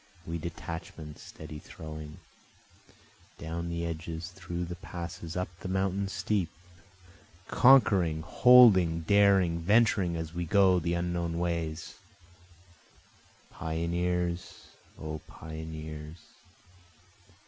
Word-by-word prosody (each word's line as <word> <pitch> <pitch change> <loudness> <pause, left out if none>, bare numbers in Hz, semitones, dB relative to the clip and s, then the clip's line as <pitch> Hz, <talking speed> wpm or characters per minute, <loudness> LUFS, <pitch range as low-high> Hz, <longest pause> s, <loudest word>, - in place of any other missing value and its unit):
We 85 +1 -4
detachments 80 -2 -7
steady 75 -1 -9
throwing, 75 -1 -9 1.2
Down 85 +1 -4
the 85 0 -3
edges, 80 +1 -5
through 85 -1 -5
the 90 +1 -6
passes, 85 -1 -7
up 90 0 -2
the - - -6
mountains 95 +1 -1
steep, 90 0 -1 1.0
Conquering, 95 -12 +5
holding, 95 -6 +6
daring, 95 -2 +4
venturing 100 -1 +3
as 80 -1 -5
we 85 0 -2
go 95 0 +4
the 85 +1 -1
unknown 85 -1 -2
ways, 85 -2 -3 1.5
Pioneers! 85 +2 -2 0.3
O 75 0 -5
pioneers! 80 0 -8
85 Hz, 95 wpm, -29 LUFS, 80-90 Hz, 1.5 s, holding